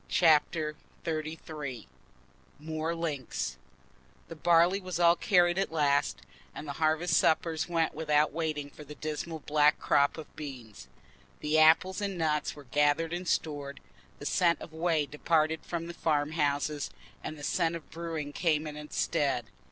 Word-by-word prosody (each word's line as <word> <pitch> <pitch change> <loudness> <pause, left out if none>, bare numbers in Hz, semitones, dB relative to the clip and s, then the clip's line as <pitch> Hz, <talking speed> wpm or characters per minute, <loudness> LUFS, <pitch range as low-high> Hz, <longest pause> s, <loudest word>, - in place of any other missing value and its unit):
Chapter 155 -2 +3 0.3
XXXIII 155 -5 -5 0.7
More 155 +2 -3
Links 140 - -3 0.7
The 165 - -7
barley 175 +4 +4
was 185 -2 -4
all 170 0 +6
carried 175 -2 +3
at 195 - -1
last, 145 -3 +1 0.3
and 155 - -7
the - - -3
harvest 160 +2 +2
suppers 160 +1 +2
went 165 -2 +1
by - - -16
without 150 -1 +2
waiting 155 -3 -3
for 150 - -11
the 150 +1 -10
dismal 155 +1 -5
black 150 0 +3
crop 140 +2 +2
of 160 - -10
beans. 130 -8 -9 0.5
The 155 +1 +2
apples 165 +5 +5
and 200 -2 -2
nuts 155 -2 0
were 145 - -11
gathered 145 +5 +1
and 180 +1 -4
stored; 145 -4 -2 0.4
the 145 - -9
scent 170 +1 +2
of 160 - -10
whey 160 -2 +1
departed 155 +2 +1
from 170 -1 -4
the 170 - -7
farm 150 -3 0
houses, 145 -1 0 0.3
and 155 - -5
the 145 - -10
scent 165 +2 +1
of 165 - -9
brewing 160 -3 -5
came 155 -2 +1
in 150 -1 -6
its 150 0 -8
stead. 140 -7 0
155 Hz, 160 wpm, -30 LUFS, 150-165 Hz, 0.7 s, all